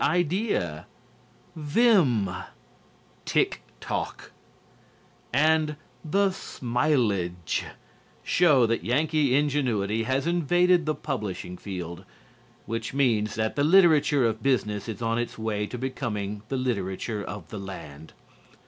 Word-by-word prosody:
Idea," 175 Hz, -, 0 dB, 0.7 s
"Vim," 150 Hz, -, +3 dB, 1.0 s
"Tick -, -, +1 dB, 0.2 s
Talk" -, -, -4 dB, 1.0 s
and 155 Hz, +2 st, +3 dB, 0.3 s
"The 195 Hz, +5 st, +2 dB
Smileage" 115 Hz, -, -1 dB, 0.6 s
show 150 Hz, -8 st, +4 dB
that 115 Hz, 0 st, -1 dB
Yankee 145 Hz, +1 st, +2 dB
ingenuity 125 Hz, -8 st, +1 dB
has 130 Hz, +3 st, 0 dB
invaded 175 Hz, 0 st, +3 dB
the 155 Hz, -, +1 dB
publishing 105 Hz, -10 st, -4 dB
field, 90 Hz, -2 st, -6 dB, 0.6 s
which 115 Hz, +3 st, -4 dB
means 110 Hz, -6 st, +2 dB
that 110 Hz, 0 st, -1 dB
the 145 Hz, -, +1 dB
literature 155 Hz, -5 st, +5 dB
of 110 Hz, -1 st, -1 dB
business 105 Hz, -5 st, 0 dB
is 110 Hz, +2 st, -5 dB
on 115 Hz, +1 st, 0 dB
its 120 Hz, -, -4 dB
way 105 Hz, -2 st, -2 dB
to 125 Hz, -, -6 dB
becoming 105 Hz, -6 st, -3 dB
the 135 Hz, -, -1 dB
literature 105 Hz, -3 st, -2 dB
of 105 Hz, -, -8 dB
the 105 Hz, -, -6 dB
land. 80 Hz, -6 st, -9 dB
125 Hz, 110 wpm, -26 LUFS, 105-150 Hz, 1.0 s, literature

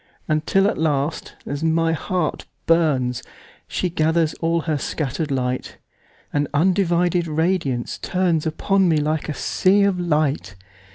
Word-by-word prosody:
Until 165 Hz, +6 st, +2 dB
at 210 Hz, -, -1 dB
last, 150 Hz, -1 st, -1 dB
as 145 Hz, +2 st, -4 dB
my 165 Hz, 0 st, +2 dB
heart 170 Hz, +1 st, -2 dB, 0.2 s
burns, 135 Hz, -7 st, +2 dB, 0.5 s
She 185 Hz, -, -1 dB
gathers 160 Hz, 0 st, +1 dB
all 165 Hz, 0 st, +1 dB
her 155 Hz, -2 st, -1 dB
scatter'd 150 Hz, +2 st, -3 dB
light, 125 Hz, -2 st, -2 dB, 0.6 s
And 145 Hz, 0 st, +1 dB
undivided 175 Hz, 0 st, +2 dB
radiance 160 Hz, -5 st, -1 dB
turnsUpon 180 Hz, +2 st, +1 dB
me 160 Hz, -2 st, +3 dB
like 155 Hz, +1 st, -1 dB
a 150 Hz, -, -3 dB
sea 200 Hz, +2 st, +2 dB
of 195 Hz, -2 st, +1 dB
light. 150 Hz, -, 0 dB
160 Hz, 125 wpm, -22 LUFS, 150-175 Hz, 0.6 s, me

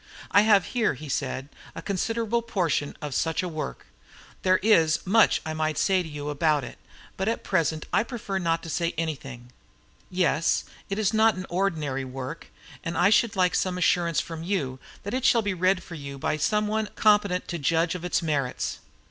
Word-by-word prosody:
"I 200 Hz, -, +7 dB
have 205 Hz, -3 st, +5 dB
here," 230 Hz, -, +2 dB
he 150 Hz, +4 st, -9 dB
said, 135 Hz, -1 st, -2 dB, 0.3 s
"a -, -, -6 dB
considerable 225 Hz, +4 st, -1 dB
portion 180 Hz, -10 st, -1 dB
of 145 Hz, -2 st, -4 dB
such 160 Hz, +6 st, 0 dB
a -, -, -2 dB
work. 155 Hz, -, -5 dB, 0.6 s
There 185 Hz, 0 st, +4 dB
is 165 Hz, -8 st, +4 dB
much 215 Hz, +3 st, +4 dB
that 160 Hz, -, -4 dB
I -, -, -3 dB
might 155 Hz, -1 st, -1 dB
say 190 Hz, -2 st, +3 dB
to 165 Hz, -, -7 dB
you 150 Hz, -1 st, -5 dB
about 150 Hz, -1 st, +2 dB
it, -, -, -9 dB, 0.4 s
but 190 Hz, -, -1 dB
at 225 Hz, -, -1 dB
present 160 Hz, -4 st, 0 dB
I -, -, +4 dB
prefer 220 Hz, -5 st, -4 dB
not 165 Hz, -2 st, 0 dB
to 165 Hz, -, -7 dB
say 170 Hz, +1 st, -1 dB
anything. 135 Hz, -6 st, -5 dB, 0.6 s
Yes, 165 Hz, -3 st, +1 dB, 0.3 s
it 195 Hz, -, -2 dB
is 215 Hz, -1 st, +1 dB
not 220 Hz, 0 st, +4 dB
ordinary 160 Hz, -8 st, -1 dB
work, 130 Hz, +3 st, -7 dB, 0.4 s
and 165 Hz, 0 st, -3 dB
I 200 Hz, +3 st, +4 dB
should 220 Hz, 0 st, +3 dB
like 180 Hz, -1 st, +2 dB
some 185 Hz, -1 st, 0 dB
assurance 170 Hz, -2 st, +2 dB
from 165 Hz, -1 st, -5 dB
you 150 Hz, -8 st, -2 dB, 0.2 s
that 205 Hz, -, -5 dB
it 260 Hz, 0 st, -1 dB
shall 235 Hz, -3 st, +4 dB
be 205 Hz, -1 st, 0 dB
read 185 Hz, +1 st, +1 dB
for -, -, -11 dB
you 140 Hz, -3 st, -7 dB
by 135 Hz, -, -1 dB
some 210 Hz, +8 st, +1 dB
one 215 Hz, 0 st, -1 dB
competent 205 Hz, -4 st, +3 dB
to 170 Hz, -, -3 dB
judge 165 Hz, +4 st, +1 dB
of 180 Hz, -2 st, -6 dB
its 180 Hz, 0 st, 0 dB
merits." 140 Hz, -5 st, -1 dB
175 Hz, 195 wpm, -26 LUFS, 155-200 Hz, 0.6 s, I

